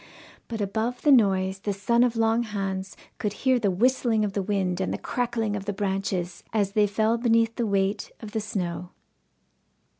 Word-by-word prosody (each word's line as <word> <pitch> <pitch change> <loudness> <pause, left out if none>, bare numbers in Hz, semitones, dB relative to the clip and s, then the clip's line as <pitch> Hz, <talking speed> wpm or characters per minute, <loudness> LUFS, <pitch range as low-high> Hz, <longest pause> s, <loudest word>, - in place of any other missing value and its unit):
But 225 -2 -4
above 220 +5 -2
the 295 - +5
noise 190 -6 +3
the 205 +1 -2
son 235 +5 +2
of 245 -1 +1
Long 225 +1 +2
Hans 195 -3 -4 0.2
could 210 -1 -1
hear 260 -1 +4
the 210 -3 +1
whistling 225 +2 +2
of 200 - -3
the 200 - 0
wind 190 -2 -1
and - - -1
the - - -2
crackling 230 -4 -2
of 200 -1 -5
the 205 - -2
branches 190 -3 -2
as 205 -3 +1
they 210 0 +3
fell 220 +3 +1
beneath 230 -1 +2
the 235 - -1
weight 200 0 0
of 215 -2 -8
the 220 - -1
snow. 180 -4 -3
205 Hz, 185 wpm, -26 LUFS, 195-230 Hz, 0.2 s, the